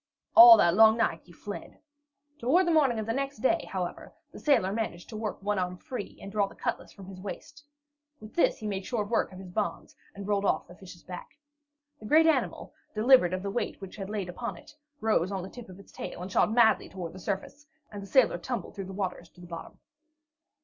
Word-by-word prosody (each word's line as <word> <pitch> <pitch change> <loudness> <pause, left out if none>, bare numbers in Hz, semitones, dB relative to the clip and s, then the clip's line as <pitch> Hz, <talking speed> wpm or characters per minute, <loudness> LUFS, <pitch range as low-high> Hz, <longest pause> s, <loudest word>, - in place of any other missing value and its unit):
All 345 0 +11
that 170 - +4
long 220 +3 +6
night 230 - 0
he 180 - -17
fled. 205 +4 -9 0.6
Toward 320 +11 +3
the 340 - +1
morning 280 -7 +3
of 220 - -3
the 225 - -1
next 275 +1 -3
day, 265 +9 +1
however, 180 -2 -5 0.2
the - - -11
sailor 230 -10 +2
managed 215 -6 -4
to - - -8
work 215 -1 -4
one 205 -1 0
arm 180 0 -2
free, 230 +1 -7
and 195 - -9
draw 200 -1 +1
the - - -14
cutlass - - -4
from 195 - -12
his 185 -1 -10
waist. 280 +8 -8 0.6
With 215 -2 -12
this 345 - +2
he 215 - -9
made 200 -2 -3
short 210 -2 -3
work 230 - +1
of 185 - -11
his 185 -1 -10
bonds 210 +3 -3 0.2
and 200 0 -7
rolled 200 -1 +1
off - - 0
the 175 - -13
fish's 180 -1 -13
back. 180 +10 -10 0.6
The 215 - -9
great 315 +6 +5
animal, 320 - 0 0.2
delivered 225 -4 +5
of 185 0 -3
the 200 - -3
weight 240 - -3
which 195 0 -10
had 195 -1 -6
lain 205 -3 -3
upon 235 +7 -5
it, - - -16 0.3
rose 210 -4 +1
on 190 -2 -3
the 190 - -7
tip 240 -5 -11
of 185 +1 -12
its 200 - -16
tail 180 - -7
and 190 - -7
shot 210 - +3
madly 225 -1 +4
toward 175 -3 -7
the 190 - -10
surface, 205 +10 -5 0.2
and 205 -1 -7
the 200 - -9
sailor 235 -7 +3
tumbled 235 0 -5
through 195 - -6
the 190 - -8
waters 185 -3 -4
to - - -22
the 175 - -11
bottom. 170 -1 -9
205 Hz, 230 wpm, -28 LUFS, 185-235 Hz, 0.6 s, All